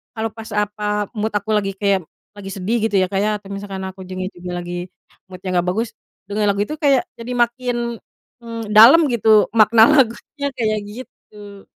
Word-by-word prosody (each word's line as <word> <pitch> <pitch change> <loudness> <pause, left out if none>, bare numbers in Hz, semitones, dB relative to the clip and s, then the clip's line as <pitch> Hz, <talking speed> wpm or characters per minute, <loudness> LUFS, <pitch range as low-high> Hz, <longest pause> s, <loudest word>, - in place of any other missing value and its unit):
kalau 220 0 -2
pas 225 0 -9
apa 210 0 -1
mood 215 +1 -2
aku 205 +1 -2
lagi 200 -2 0
kayak, 200 -3 +1 0.3
lagi 205 -2 -11
sedih 195 +4 -2
gitu 205 - -4
ya 185 - +2
Kak 195 - 0
ya, 210 - +1
atau 200 - -16
misalkan 200 -1 -6
aku 190 0 -9
juga 185 0 -5
juga 180 0 -7
lagi 175 +1 -5 0.4
mood-nya 185 0 -6
nggak 175 - -2
bagus, 220 +6 -1 0.4
denger 205 +1 -1
lagu 200 0 +1
itu 305 - -5
kayak 285 -1 +3 0.2
jadi 230 +2 -6
makin, 245 +1 0 0.6
mmm, 230 -2 -7
dalam 245 +10 +8
gitu 220 -2 +4
makna 220 0 +6
lagunya 280 +1 +1
kayak 215 -2 0
gitu. 205 -3 -12
210 Hz, 180 wpm, -20 LUFS, 195-230 Hz, 0.6 s, dalam